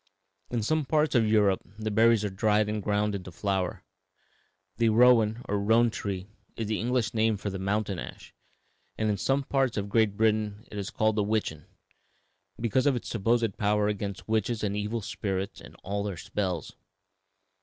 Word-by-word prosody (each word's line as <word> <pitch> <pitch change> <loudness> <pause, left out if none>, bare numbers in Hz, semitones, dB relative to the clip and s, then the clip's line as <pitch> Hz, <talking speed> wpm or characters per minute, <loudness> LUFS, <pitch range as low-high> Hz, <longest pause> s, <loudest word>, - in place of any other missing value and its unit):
In 120 -3 -1
some 155 +7 +1
parts 150 +2 +1
of 115 -4 +3
Europe 105 -3 +3 0.2
the 110 0 -3
berries 110 0 +4
are 100 - -2
dried 105 +1 +2
and 105 0 -2
ground 105 +1 0
into 95 -2 -6
flour. 95 0 -2 0.9
The 115 -1 +3
rowan, 115 0 +4
or 100 0 0
roan, 115 +3 +3
tree 95 -4 -4 0.3
is 115 - -3
the 105 0 -1
English 120 -1 0
name 110 -1 +2
of 100 0 -4
the 95 - -5
mountain 100 -1 -1
ash, - - -9 0.6
and 110 -1 +1
in 100 - -1
some 135 +7 +1
parts 135 -3 0
of 100 0 -2
Great 105 -2 +2
Britain 110 -1 +1
it 105 - -5
is 100 - -4
called 110 0 +1
witchen, 105 -8 -1 0.9
because 120 +4 +1
of 140 - +3
its 120 - -5
supposed 115 -1 +1
power 105 0 +2
against 100 -1 -4
witches 110 +1 0
and 100 -1 -1
evil 105 +2 -2
spirits 95 -1 -4
and - - -13
all 100 +1 -2
their 100 -3 -4
spells. 95 -2 -3
105 Hz, 175 wpm, -28 LUFS, 100-115 Hz, 0.9 s, berries